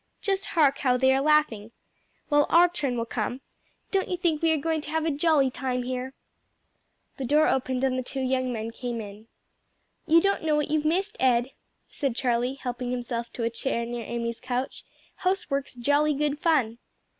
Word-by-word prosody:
Just 395 0 -1
hark 285 -3 +4
how 250 -3 +2
they 265 +1 +4
are 270 - +2
laughing! 295 -8 +2 0.6
Well, 290 0 +4
our 345 +1 +6
turn 285 -8 -2
will 230 - -1
come. 235 +2 -3 0.5
Don't 390 -1 +1
you 360 - -1
think 335 -4 0
we 330 - +3
are 320 - +2
going 320 +1 -1
to 295 - -8
have 320 0 -1
a 325 - +1
jolly 290 -2 +2
time 250 -1 -2
here?" 255 +1 -4 1.0
The 270 - -4
door 300 +4 +4
opened 260 0 0
and 255 -1 +1
the - - -3
two 270 +2 -5
young 255 -1 0
men 225 -1 -4
came 240 0 -4
in. 210 +1 -9 0.8
"You 330 +1 +6
don't 395 +3 +1
know 310 -1 +1
what 300 0 -1
you've 305 -1 +1
missed, 380 +7 0
Ed," 250 0 +2 0.4
said 275 -5 -2
Charlie 245 0 0
helping 250 -2 -4
himself 240 -1 -3
to 235 - -4
a 230 - 0
chair 235 0 -2
near 240 0 -5
Amy's 235 0 -4
couch; 250 +1 -4 0.3
"housework's 310 -9 -1
jolly 290 +4 +2
good 295 0 -1
fun." 260 -9 +1
265 Hz, 190 wpm, -26 LUFS, 245-305 Hz, 1.0 s, our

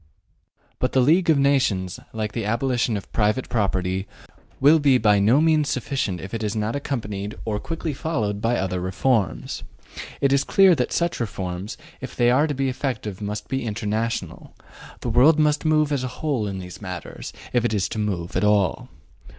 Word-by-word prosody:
But 125 - 0
the 130 - +4
League 165 +7 +4
of 155 - +5
Nations, 130 -10 +1
like 110 -1 -3
the 115 - -3
abolition 115 +1 0
of 100 - -10
private 110 +4 +1
property, 95 -3 -1 0.5
will 150 +4 +6
be 140 -3 +4
by 105 -4 +4
no 110 +8 +4
means 155 -2 +3
sufficient 125 -8 -2
if 95 +6 -8
it 115 - -3
is 105 +1 -2
not 110 +2 -1
accompanied 105 -7 -4
or 105 -2 -1
quickly 165 +2 -4
followed 110 -9 -2
by 120 +2 +1
other 95 -1 -1
reforms. 95 0 -1 0.6
It 140 -1 +3
is 140 - +3
clear 195 -2 +5
that 125 -6 -1
such 170 0 0
reforms, 95 -3 -4 0.2
if 130 - -7
they 120 -1 +3
are 145 +5 +3
to 145 - -2
be 135 0 0
effective, 125 -6 -3
must 105 +1 -4
be 135 -2 -2
international; 110 +1 -3 0.5
the 120 - -2
world 130 +8 +5
must 150 0 +2
move 155 -1 +3
as 140 -3 0
a - - -1
whole 135 -9 -1
in 95 -1 -4
these 90 +1 -9
matters, 90 -4 -7 0.2
if 120 -2 +2
it 120 - +1
is 100 -3 0
to 110 - -4
move 95 -5 -3
at - - +1
all. 105 -4 +2
115 Hz, 185 wpm, -23 LUFS, 105-140 Hz, 0.6 s, will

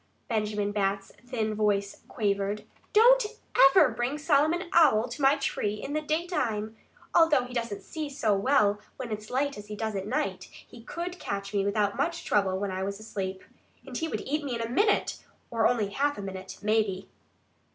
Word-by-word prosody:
Benjamin 210 -3 -1
Bat's 195 -1 -1 0.2
thin 220 -4 -1
voice 205 -2 0
quavered. 200 -2 -1 0.3
"Don't - - +6 0.5
EVER 270 0 +5
bring 240 +5 -2
Solomon 310 +3 +2
Owl 265 -9 +5
to 240 +5 -7
my 275 +1 +5
tree 270 -7 -1
in 275 +6 -6
the 305 - 0
daytime. 300 - -1 0.4
Although 325 -6 +5
he 250 0 -9
doesn't 230 -4 -3
see 310 -2 -5
so 225 -7 +1
well 205 -2 +3 0.2
when 250 -4 -6
it's 215 0 -5
light 275 -1 -1
as 205 - -11
he 210 - -6
does 220 0 -3
at 195 0 -3
night, 190 -3 -2 0.2
he 235 - -13
could 350 +8 -6
catch 200 0 -4
me 200 -1 +1
without 200 +1 0
much 335 +4 -1
trouble 195 -2 +2
when 200 0 -2
I 185 0 -3
was 200 +1 -3
asleep. 190 -3 -5 0.4
And - - -9
he 325 - -1
would - - -3
eat 300 +2 -2
me 265 -4 -3
in 230 - -3
a 230 - -3
minute 405 - +1 0.3
or 225 -2 +3
only 225 -5 0
half 285 +7 0
a 200 - -5
minute, 190 -1 -7
maybe." 210 -3 +1
220 Hz, 185 wpm, -28 LUFS, 200-285 Hz, 0.5 s, Don't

